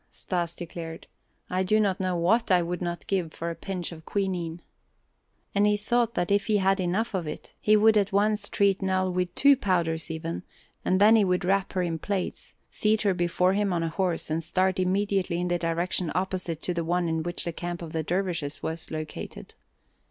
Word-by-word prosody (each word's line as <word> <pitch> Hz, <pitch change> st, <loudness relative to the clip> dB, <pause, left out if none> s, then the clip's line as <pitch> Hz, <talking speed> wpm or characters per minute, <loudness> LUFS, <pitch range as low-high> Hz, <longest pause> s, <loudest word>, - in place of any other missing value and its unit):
Stas 170 Hz, -2 st, -2 dB
declared, 165 Hz, -1 st, -7 dB, 0.4 s
"I 185 Hz, +1 st, 0 dB
do 215 Hz, +4 st, +3 dB
not 195 Hz, -3 st, +1 dB
know 185 Hz, -2 st, 0 dB
what 225 Hz, +8 st, +2 dB
I 180 Hz, -2 st, +4 dB
would 175 Hz, +2 st, -3 dB
not 175 Hz, -1 st, -3 dB
give 180 Hz, -5 st, -1 dB
for 170 Hz, +1 st, -4 dB
a -, -, -6 dB
pinch 180 Hz, -2 st, -3 dB
of 160 Hz, -1 st, -10 dB
quinine." 175 Hz, -3 st, -2 dB, 0.9 s
And 205 Hz, +1 st, +3 dB
he 210 Hz, 0 st, +3 dB
thought 235 Hz, +2 st, 0 dB
that 175 Hz, +2 st, 0 dB
if 200 Hz, -1 st, +2 dB
he 215 Hz, -2 st, +3 dB
had 195 Hz, 0 st, +2 dB
enough 190 Hz, +6 st, 0 dB
of 180 Hz, -4 st, -2 dB
it, 150 Hz, -, -7 dB
he 215 Hz, 0 st, +5 dB
would 220 Hz, +1 st, +5 dB
at 205 Hz, -1 st, +2 dB
once 205 Hz, +1 st, +2 dB
treat 200 Hz, -1 st, +2 dB
Nell 185 Hz, -1 st, +1 dB
with 180 Hz, -1 st, -1 dB
two 280 Hz, 0 st, +6 dB
powders, 170 Hz, -9 st, 0 dB
even, 160 Hz, +1 st, -4 dB, 0.4 s
and 185 Hz, -, +2 dB
then 215 Hz, +3 st, +7 dB
he 215 Hz, -, +4 dB
would 180 Hz, -1 st, +1 dB
wrap 195 Hz, +1 st, +1 dB
her 185 Hz, -2 st, +1 dB
in 165 Hz, -2 st, -2 dB
plaids, 195 Hz, 0 st, -4 dB, 0.2 s
seat 215 Hz, 0 st, +1 dB
her 200 Hz, -2 st, +3 dB
before 180 Hz, +1 st, +2 dB
him 205 Hz, -1 st, +1 dB
on 170 Hz, -2 st, 0 dB
a 165 Hz, -, -1 dB
horse, 170 Hz, -2 st, -1 dB
and 165 Hz, +1 st, 0 dB
start 185 Hz, +2 st, +1 dB
immediately 190 Hz, -1 st, +1 dB
in 180 Hz, 0 st, -1 dB
a 175 Hz, -, +1 dB
direction 170 Hz, +1 st, 0 dB
opposite 180 Hz, -3 st, -2 dB
to 180 Hz, -, -1 dB
the 170 Hz, -1 st, -1 dB
one 175 Hz, +1 st, 0 dB
in 160 Hz, 0 st, 0 dB
which 175 Hz, +2 st, -3 dB
the 170 Hz, -, -2 dB
camp 175 Hz, +1 st, -5 dB
of 160 Hz, -, -7 dB
the 160 Hz, -, -1 dB
dervishes 165 Hz, -3 st, -2 dB
was 160 Hz, 0 st, -4 dB
located. 155 Hz, -1 st, -6 dB
180 Hz, 210 wpm, -27 LUFS, 170-200 Hz, 0.9 s, then